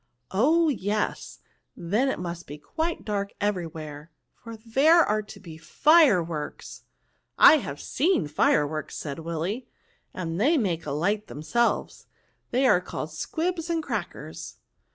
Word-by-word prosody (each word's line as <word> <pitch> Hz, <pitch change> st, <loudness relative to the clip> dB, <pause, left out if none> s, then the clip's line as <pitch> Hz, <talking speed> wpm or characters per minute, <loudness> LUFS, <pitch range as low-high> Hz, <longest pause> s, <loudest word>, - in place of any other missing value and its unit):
*' 120 Hz, -, -50 dB
" 125 Hz, -, -47 dB
Oh! 310 Hz, -, +3 dB
yes, 210 Hz, -5 st, -2 dB, 0.4 s
then 210 Hz, +11 st, 0 dB
it -, -, -2 dB
must 175 Hz, -1 st, -6 dB
be 145 Hz, -, -8 dB
quite 320 Hz, -, -4 dB
dark 200 Hz, -2 st, -2 dB
every 200 Hz, -4 st, -1 dB
where, 155 Hz, -1 st, -9 dB, 0.2 s
for 230 Hz, -1 st, -11 dB
there 275 Hz, +10 st, +4 dB
are 215 Hz, +1 st, 0 dB
to 210 Hz, -, -12 dB
be 165 Hz, -4 st, -11 dB
fireworks." 175 Hz, -, +2 dB, 0.3 s
'* -, -, -47 dB
I 315 Hz, -, +6 dB
have 145 Hz, -, -6 dB
seen 300 Hz, -, 0 dB
fireworks," 150 Hz, 0 st, 0 dB
said 145 Hz, 0 st, -5 dB
Willy, 170 Hz, +9 st, -4 dB, 0.2 s
'* -, -, -34 dB
they 185 Hz, -, +1 dB
make 175 Hz, -, -1 dB
a -, -, -2 dB
light 200 Hz, +9 st, -1 dB
themselves; 235 Hz, +11 st, -1 dB, 0.4 s
they 260 Hz, +2 st, +1 dB
are 180 Hz, -8 st, +5 dB
called 160 Hz, -3 st, -6 dB
squibs 330 Hz, -, -3 dB
and 330 Hz, -1 st, 0 dB
crackers." -, -, -6 dB
200 Hz, 150 wpm, -26 LUFS, 160-265 Hz, 0.4 s, I